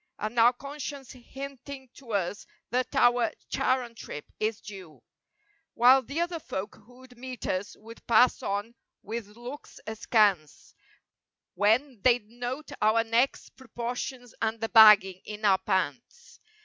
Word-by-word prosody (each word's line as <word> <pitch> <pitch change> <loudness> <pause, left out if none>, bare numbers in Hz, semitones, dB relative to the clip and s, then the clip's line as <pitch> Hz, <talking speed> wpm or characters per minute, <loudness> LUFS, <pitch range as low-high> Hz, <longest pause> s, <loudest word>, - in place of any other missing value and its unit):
And 215 +3 -3
our 235 +2 +6
conscience 280 0 -8
hinting 270 +1 -9
to 240 -5 -10
us 195 0 -2 0.2
that 255 +3 -1
our 245 -3 +3 0.2
Charon 255 -2 0
trip 150 -9 -9
is 215 0 -1
due; 190 -8 -12 0.7
While 255 +3 +6
the 280 +6 -4
other 345 -1 -2
folk 200 -7 -5
who'd 250 0 -17
meet 255 0 -8
us 185 +2 -3
would 225 +2 -14
pass 240 +2 +4
on 205 +4 -3 0.3
with 215 -1 -7
looks 250 +5 -10
askance 210 - 0 0.8
When 225 +3 +1
they'd 240 -3 +3
note 245 +6 -6
our 220 +2 +3
neck's 230 +4 0
proportions 245 0 -6
and 225 0 -1
the 225 - -3
bagging 210 -5 +7
in 210 0 -6
our 190 -2 +4
pants. 190 - -3
235 Hz, 135 wpm, -28 LUFS, 210-255 Hz, 0.8 s, bagging